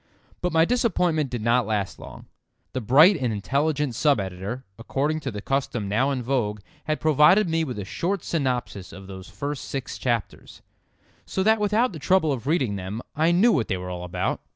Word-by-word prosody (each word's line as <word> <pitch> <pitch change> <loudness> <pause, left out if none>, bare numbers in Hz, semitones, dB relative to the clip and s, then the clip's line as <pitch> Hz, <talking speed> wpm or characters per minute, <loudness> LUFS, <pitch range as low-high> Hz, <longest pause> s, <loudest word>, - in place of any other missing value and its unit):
But 180 - 0
my 160 0 +4
disappointment 175 - +1
did 120 -3 -4
not 120 +2 +2
last 105 -3 -2
long. - - -11 0.5
The 130 - -2
bright 150 - +6
and 125 -7 -1
intelligent 140 +6 0
sub 140 +1 +2
editor, 95 +7 -5
according 145 +6 -1
to 140 - -4
the 105 -4 -7
custom 135 -6 -1
now 120 +8 +1
in 130 -3 -2
vogue, 115 -5 -1 0.2
had 155 0 -1
provided 155 +7 +5
me 165 0 +1
with 130 -7 -4
a 100 - -4
short 185 - -2
synopsis 125 - -2
of 95 0 -11
those 95 -1 -10
first 145 -1 -5
six 135 -2 -5
chapters, 120 -4 -3 0.6
so 190 - -2
that 220 +2 +4
without 210 +2 +2
the 160 - -7
trouble 160 0 +2
of 130 0 -6
reading 130 - +1
them 95 +5 -5
I 160 +3 +3
knew 200 +8 +5
what 130 - +1
they 95 - -1
were 90 0 -6
all 90 0 -5
about. 90 - -2
135 Hz, 195 wpm, -24 LUFS, 110-160 Hz, 0.6 s, bright